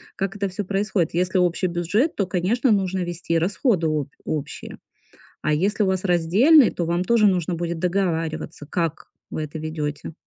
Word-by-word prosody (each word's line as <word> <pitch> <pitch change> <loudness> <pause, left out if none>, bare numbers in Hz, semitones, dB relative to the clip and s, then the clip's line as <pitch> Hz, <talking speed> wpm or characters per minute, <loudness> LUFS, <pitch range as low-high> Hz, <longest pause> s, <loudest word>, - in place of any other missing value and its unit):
Как 195 0 -3
это 200 0 -1
всё 190 +3 -4
происходит? 195 -3 0
Если 180 +2 +1
общий 180 0 +2
бюджет, 180 - 0
то, 200 - -1
конечно, 200 +8 +1
нужно 190 -2 +1
вести 170 -1 -2
расходы 185 - +1
обь 150 -3 -2
общие, 150 -3 -5 0.7
а - - +1
если 200 +8 +1
у - - +1
вас 190 0 0
раздельный, 195 - +5
то 175 - -3
вам 170 +2 0
тоже 230 0 +4
нужно 180 -3 +1
будет 170 0 -3
договариваться, 165 -4 -2
как 165 -2 -2 0.2
вы 155 - -3
это 155 +1 -6
ведёте. 155 -1 -4
180 Hz, 170 wpm, -23 LUFS, 165-195 Hz, 0.7 s, раздельный